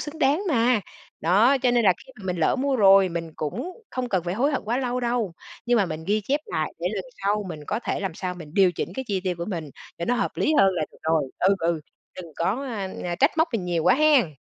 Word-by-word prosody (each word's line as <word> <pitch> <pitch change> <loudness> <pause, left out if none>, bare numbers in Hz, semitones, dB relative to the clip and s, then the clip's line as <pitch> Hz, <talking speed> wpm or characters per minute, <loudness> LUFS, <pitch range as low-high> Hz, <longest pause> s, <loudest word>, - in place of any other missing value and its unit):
xứng 305 +2 -7
đáng 295 +7 +2
mà. 240 -4 +3 0.4
Đó, 210 - +4
cho 250 - +4
nên 240 -2 +2
là 185 - +6
khi 260 - -16
mà - - -11
mình 180 -1 -1
lỡ 160 - +2
mua 270 0 0
rồi 195 -2 +6
mình 165 -1 -4
cũng 155 - -4 0.2
không 255 -1 -3
cần 185 -5 0
phải 175 +2 -2
hối 275 +7 +2
hận - - -1
quá 235 +3 0
lâu 250 -1 -1
đâu, 235 -6 -1 0.3
nhưng 240 0 +3
mà 200 -4 +3
mình 155 0 -6
ghi 210 +2 +2
chép 280 +8 -1
lại - - -2
để - - -1
lần - - -3 0.2
sau 205 +1 +1
mình 150 -3 -7
có 215 +3 -2
thể - - -1
làm 190 -4 -3
sao 180 +1 -4
mình 160 -3 -11
điều 190 -3 +5
chỉnh - - -4
cái 265 0 -4
chi 195 -2 0
tiêu 180 -1 0
của 170 - -3
mình 165 -7 -5 0.3
để 170 - -2
nó 245 - +1
hợp 245 - 0
lý 310 - +2
hơn 190 -1 +5
là 160 - -1
được - - -19
rồi. 160 0 +2 0.2
Ừ, 195 +2 +4
ừ, 165 -1 0 0.4
đừng 170 -3 -9
có, 200 +11 0
à, 205 -5 -3 0.2
à, 175 -1 -2
trách 280 - +2
móc 320 - +4
mình 205 -6 -1
nhiều 175 -2 0
quá - - +6
hén. 275 - +4
200 Hz, 270 wpm, -24 LUFS, 175-250 Hz, 0.4 s, là